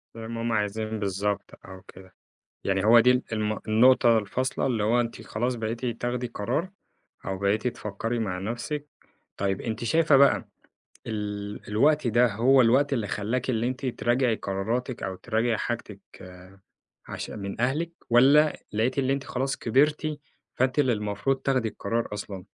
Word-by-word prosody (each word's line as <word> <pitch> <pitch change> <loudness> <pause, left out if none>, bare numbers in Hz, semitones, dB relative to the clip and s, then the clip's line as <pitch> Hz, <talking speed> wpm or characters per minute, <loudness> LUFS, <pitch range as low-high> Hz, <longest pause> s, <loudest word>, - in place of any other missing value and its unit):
زي 115 -1 -7
ما 115 0 -5
هُم 115 0 -1
عايزين 110 0 -2
بالضبط، 100 +1 -2
آه 95 - -10
وكده. 95 0 -16 0.5
يعني 95 0 0
هو 115 +2 +7
دي 125 +2 +5
ال 125 0 +3
الم 110 -1 -1
النقطة 115 0 +5
الفاصلة 125 +7 -2
اللي 115 -5 0
هو 115 +3 +3
أنتِ 115 -1 -4
خلاص 120 +4 -1
بقيتِ 115 +2 -3
تاخدي 120 +1 -2
قرار 120 - -2 0.6
أو 95 -1 -3
بقيتِ 105 +5 +1
تفكري 110 +2 -4
مع 95 -5 -2
نفسِك. 120 +9 -4 0.5
طيب 95 -1 -1
أنتِ 115 0 -4
شايفة 155 +4 +4
بقى 140 0 +4 0.6
ال 105 -2 -4
الوقت 140 +6 +3
ده 120 +2 +4
هو 130 +4 +5
الوقت 130 +5 +3
اللي 115 -6 0
خلاكِ 115 +6 -2
اللي 115 -1 0
أنتِ 130 +1 -4
تراجعي 120 -1 +1
قراراتِك 115 +6 -3
أو 95 - -3
تراجعي 115 +2 0
حاجتِك 110 -4 -4 1.1
عش - - -6
من 100 +2 -6
أهلِك، 150 +7 0 0.2
والَّا 140 +6 +5 0.2
لقيتِ 120 +6 0
إن 130 0 0
أنتِ 140 0 0
خلاص 135 +2 -2
كبرتِ 150 +5 +1 0.4
فأنتِ 130 +3 +1
اللي 130 -4 +3
المفروض 105 +6 -1
تاخدي 130 -4 +1
القرار 115 +2 -2
أصلًا؟ 100 -2 -7
115 Hz, 155 wpm, -26 LUFS, 105-130 Hz, 1.1 s, هو